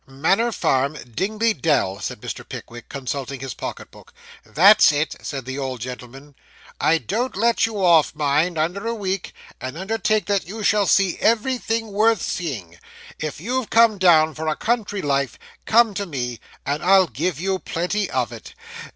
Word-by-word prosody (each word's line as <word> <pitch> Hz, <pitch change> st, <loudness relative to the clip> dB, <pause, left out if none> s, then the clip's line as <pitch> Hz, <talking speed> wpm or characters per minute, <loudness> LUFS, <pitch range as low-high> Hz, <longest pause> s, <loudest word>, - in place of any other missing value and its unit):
'Manor 195 Hz, -, +1 dB
Farm, 140 Hz, -, 0 dB, 0.2 s
Dingley 215 Hz, -, 0 dB
Dell,' 135 Hz, -, 0 dB
said -, -, -5 dB
Mr. -, -, -6 dB
Pickwick, 120 Hz, 0 st, -9 dB
consulting 135 Hz, 0 st, -5 dB
his 135 Hz, -2 st, -5 dB
pocket -, -, -7 dB
book. -, -, -17 dB, 0.3 s
'That's 195 Hz, +2 st, +6 dB
it,' 150 Hz, +2 st, -1 dB
said 135 Hz, -4 st, -5 dB
the 130 Hz, +2 st, -5 dB
old 130 Hz, -2 st, -4 dB
gentleman. 130 Hz, +4 st, -9 dB, 0.5 s
'I 165 Hz, -, +3 dB
don't 230 Hz, +9 st, -3 dB
let 230 Hz, +2 st, +2 dB
you 205 Hz, -4 st, -2 dB
off, 165 Hz, -3 st, +4 dB
mind, 150 Hz, +4 st, +1 dB
under 180 Hz, +8 st, -1 dB
a 230 Hz, -, -1 dB
week; 195 Hz, -3 st, -3 dB, 0.3 s
and 130 Hz, +4 st, -5 dB
undertake 215 Hz, +2 st, 0 dB
that 200 Hz, -4 st, 0 dB
you 215 Hz, +3 st, -6 dB
shall 205 Hz, -1 st, +3 dB
see 195 Hz, -3 st, +2 dB
everything 230 Hz, -1 st, 0 dB
worth 215 Hz, 0 st, +2 dB
seeing. 105 Hz, -, -4 dB, 0.4 s
If 155 Hz, -2 st, -4 dB
you've 245 Hz, +6 st, -2 dB
come 225 Hz, -3 st, +4 dB
down 160 Hz, -4 st, +5 dB
for 160 Hz, +1 st, -5 dB
a 155 Hz, -, +1 dB
country 220 Hz, -4 st, -1 dB
life, 140 Hz, -3 st, 0 dB, 0.3 s
come 225 Hz, -1 st, +4 dB
to 200 Hz, 0 st, -3 dB
me, 125 Hz, -6 st, -4 dB, 0.3 s
and 145 Hz, +2 st, -2 dB
I'll 190 Hz, +1 st, +6 dB
give 165 Hz, 0 st, -3 dB
you 190 Hz, +1 st, -1 dB
plenty 180 Hz, +6 st, -2 dB
of -, -, -1 dB
it. -, -, -11 dB
175 Hz, 170 wpm, -22 LUFS, 140-210 Hz, 0.5 s, That's